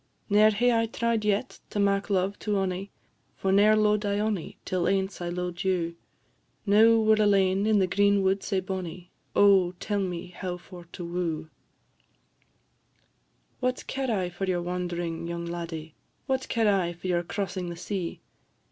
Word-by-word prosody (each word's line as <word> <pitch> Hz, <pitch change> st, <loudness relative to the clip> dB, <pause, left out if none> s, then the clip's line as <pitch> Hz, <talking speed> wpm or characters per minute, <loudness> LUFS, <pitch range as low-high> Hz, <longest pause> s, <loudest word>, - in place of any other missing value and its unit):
Ne'er 210 Hz, +1 st, +6 dB
hae 240 Hz, +4 st, +2 dB
I 230 Hz, 0 st, +2 dB
tried 230 Hz, -1 st, -1 dB
yet 210 Hz, +4 st, -1 dB
to 205 Hz, -, -3 dB
mak 200 Hz, 0 st, +1 dB
love 195 Hz, 0 st, 0 dB
to 210 Hz, -1 st, -1 dB
onie, 190 Hz, +1 st, -2 dB, 0.5 s
For 190 Hz, -, -1 dB
ne'er 205 Hz, +2 st, +5 dB
lo'ed 210 Hz, 0 st, +2 dB
I 200 Hz, 0 st, 0 dB
onie 210 Hz, -5 st, -2 dB
till 180 Hz, -2 st, 0 dB
ance 190 Hz, -1 st, 0 dB
I 175 Hz, -, -2 dB
lo'ed 180 Hz, 0 st, -4 dB
you; 175 Hz, -3 st, 0 dB, 0.7 s
Now 220 Hz, +3 st, +6 dB
we 220 Hz, -1 st, +4 dB
're 215 Hz, -, +3 dB
alane 195 Hz, -1 st, +3 dB
in 215 Hz, -1 st, +4 dB
the 190 Hz, -, +4 dB
green 200 Hz, +1 st, +3 dB
wood 190 Hz, +1 st, +2 dB
sae 195 Hz, -3 st, -1 dB
bonnie 185 Hz, -2 st, -6 dB, 0.2 s
Oh, 195 Hz, -3 st, +5 dB
tell 205 Hz, +3 st, -2 dB
me 180 Hz, -2 st, -3 dB
how 180 Hz, 0 st, -5 dB
for 175 Hz, 0 st, -12 dB
to 175 Hz, -, -6 dB
woo!" 170 Hz, -2 st, -3 dB, 2.1 s
"What 255 Hz, 0 st, -1 dB
care 265 Hz, -1 st, -3 dB
I 190 Hz, -5 st, 0 dB
for 175 Hz, +3 st, -3 dB
your 180 Hz, -2 st, -1 dB
wand'ring, 175 Hz, -2 st, -3 dB
young 170 Hz, 0 st, -4 dB
laddie? 165 Hz, -2 st, -6 dB, 0.3 s
What 265 Hz, -1 st, -1 dB
care 225 Hz, -3 st, +3 dB
I 175 Hz, -1 st, -2 dB
for 175 Hz, +2 st, -15 dB
your 175 Hz, -2 st, +1 dB
crossing 185 Hz, 0 st, -4 dB
the 170 Hz, -, -5 dB
sea? 180 Hz, -1 st, -4 dB
190 Hz, 170 wpm, -27 LUFS, 175-210 Hz, 2.1 s, Ne'er